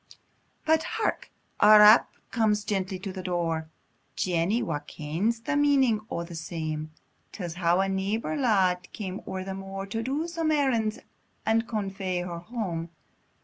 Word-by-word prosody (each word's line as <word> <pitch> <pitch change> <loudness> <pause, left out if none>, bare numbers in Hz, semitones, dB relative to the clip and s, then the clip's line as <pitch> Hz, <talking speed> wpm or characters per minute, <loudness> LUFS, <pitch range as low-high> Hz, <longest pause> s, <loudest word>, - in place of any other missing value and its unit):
But 320 0 +4 0.2
hark! 445 - -1 0.3
a 215 0 +8
rap 210 +2 +8 0.2
comes 215 -3 +2
gently 190 -2 -2
to 190 0 -6
the 185 - -5
door; 165 -3 -2 0.5
Jenny, 180 +6 +1
wha 165 -4 -2
kens 165 +10 -2
the 295 +5 -1
meaning 275 -6 +3
o' 170 - -3
the 170 0 -9
same, 155 -2 -4 0.4
Tells 175 -5 -5
how 175 +1 +2
a 195 - +1
neibor 195 +8 -1
lad 190 -9 +2
came 195 -2 -5
o'er 190 0 -4
the 190 0 -5
moor, 195 0 -6
To 225 +3 -3
do 280 +7 -2
some 330 -2 -1
errands, 250 -8 +1 0.5
and 225 +1 +2
convoy 195 -4 -2
her 175 -1 -5
hame. 175 -5 -4
195 Hz, 150 wpm, -27 LUFS, 175-225 Hz, 0.5 s, a